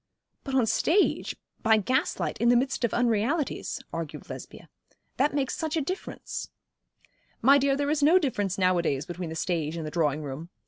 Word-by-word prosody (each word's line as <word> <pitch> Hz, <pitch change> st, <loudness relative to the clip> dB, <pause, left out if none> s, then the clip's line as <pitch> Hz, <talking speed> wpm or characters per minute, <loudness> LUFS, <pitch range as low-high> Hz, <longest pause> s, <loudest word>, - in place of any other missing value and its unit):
'But 270 Hz, -, -3 dB
on 260 Hz, -, +5 dB
the -, -, +2 dB
stage, 340 Hz, -, +2 dB, 0.3 s
by 220 Hz, -1 st, +5 dB
gaslight, 255 Hz, -, 0 dB
in 235 Hz, -, +4 dB
the 245 Hz, -, +6 dB
midst 260 Hz, +1 st, 0 dB
of 235 Hz, -, +2 dB
unrealities,' 245 Hz, +6 st, 0 dB
argued 165 Hz, -2 st, -6 dB
Lesbia. -, -, -9 dB, 0.5 s
'That 285 Hz, +2 st, +2 dB
makes 270 Hz, -3 st, 0 dB
such 320 Hz, 0 st, -2 dB
a -, -, +2 dB
difference.' 365 Hz, +7 st, -5 dB, 0.9 s
'My 275 Hz, +4 st, +7 dB
dear, 275 Hz, 0 st, +2 dB
there 285 Hz, +1 st, 0 dB
is 305 Hz, -1 st, +1 dB
no 315 Hz, +6 st, +6 dB
difference 205 Hz, -, 0 dB
nowadays 175 Hz, -7 st, +1 dB
between 175 Hz, -1 st, -5 dB
the 160 Hz, -, -6 dB
stage 160 Hz, -1 st, -1 dB
and 160 Hz, -, -4 dB
the 155 Hz, -, -5 dB
drawing 155 Hz, -2 st, 0 dB
room. 145 Hz, +4 st, -6 dB
235 Hz, 180 wpm, -27 LUFS, 170-280 Hz, 0.9 s, My